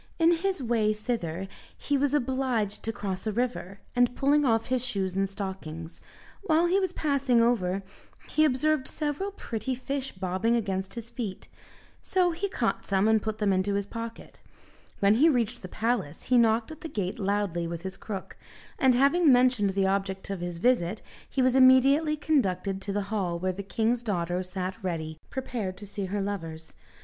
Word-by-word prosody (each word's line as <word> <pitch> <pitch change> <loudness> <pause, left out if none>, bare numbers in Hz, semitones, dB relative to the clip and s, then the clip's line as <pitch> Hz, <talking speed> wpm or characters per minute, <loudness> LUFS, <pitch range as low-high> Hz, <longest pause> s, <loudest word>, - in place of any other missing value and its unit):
In 330 0 +5
his 375 -4 -1
way 225 -3 +2
thither, 195 -5 -3 0.3
he 285 - -1
was 285 +1 +2
obliged 255 -6 0
to 225 - -2
cross 195 -1 -4
a - - +1
river, 210 -4 -3
and 245 0 +3
pulling 290 +2 +3
off 225 -3 +2
his 255 -1 0
shoes 195 -7 -1
and 195 0 +1
stockings, 185 -5 -6 0.4
while 335 -4 +3
he 365 +3 +3
was 375 -3 0
passing 280 -7 +1
over 200 -5 +2 0.4
he 310 - +2
observed 305 0 +2
several 305 +6 -2
pretty 255 - -4
fish 270 +1 -3
bobbing 190 +5 0
against 195 -3 -2
his 235 0 -7
feet; 215 -7 -5 0.5
so 365 -2 +2
he 365 +5 -3
caught - - -1
some 195 +1 +2
and 220 -1 +4
put 220 0 -3
them 205 -3 +2
into 190 +2 +1
his 200 0 0
pocket. 230 +2 -8 0.6
When 200 +1 +5
he 290 +9 +5
reached 240 -4 0
the 185 - -7
palace 220 -7 -2
he 250 - +3
knocked 225 +2 +2
at 315 - -10
the 325 - -6
gate 200 -5 -3
loudly 195 -4 0
with 170 0 -5
his 190 0 -5
crook, 195 -3 -7 0.4
and 260 -2 +5
having 280 +5 +5
mentioned 245 -5 +4
the 195 0 +1
object 195 0 -1
of 195 - -3
his 175 -1 -4
visit, 215 -2 +1 0.3
he 265 - +1
was 255 -1 +4
immediately 270 +4 +5
conducted 195 - 0
to 200 - -3
the 205 0 -1
hall 180 -5 0
where 185 +2 -1
the 195 - -5
king's 225 +4 0
daughter 180 -5 -1
sat 185 +3 -5
ready 160 -3 -3
prepared 230 -8 -4
to 205 - -8
see 200 0 -5
her 200 +2 -2
lovers. 165 -5 -5
220 Hz, 180 wpm, -28 LUFS, 190-260 Hz, 0.6 s, In